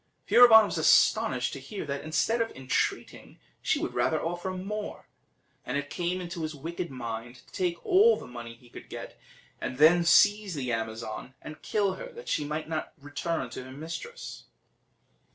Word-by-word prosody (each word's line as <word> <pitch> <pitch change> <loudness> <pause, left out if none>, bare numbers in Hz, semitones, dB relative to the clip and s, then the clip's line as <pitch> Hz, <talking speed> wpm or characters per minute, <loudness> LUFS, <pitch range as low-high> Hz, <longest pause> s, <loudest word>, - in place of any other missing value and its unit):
Furibon 225 -3 +8
was - - -3
astonished - - +3
to - - -6
hear 205 -6 -7
that, 140 -1 -4
instead 225 +9 +1
of 225 - 0
entreating, 130 -1 -2 0.2
she - - +1
would - - -3
rather - - +1
offer 175 +3 -3
more; 200 +3 -5 0.6
and 125 +3 -2
it 145 0 -4
came 180 +1 -2
into 175 -1 -6
his 155 -1 -4
wicked 170 +4 -5
mind 120 -1 -6
to 125 - -20
take 175 -2 -2
all 425 +5 +5
the - - -9
money 120 -1 -9
he 120 +1 -20
could - - -12
get, - - -8 0.4
and 130 - -4
then 165 +4 +6
seize 205 +2 +4
the 130 -4 -2
Amazon 110 +2 -5
and 155 -1 -10
kill 200 +1 0
her, - - -8
that 475 +1 -11
she 150 - 0
might 150 +2 -4
never 160 -1 -3
return 145 0 -3
to 130 - -6
her 130 - -11
mistress. 165 - -8
160 Hz, 175 wpm, -28 LUFS, 130-190 Hz, 0.6 s, Furibon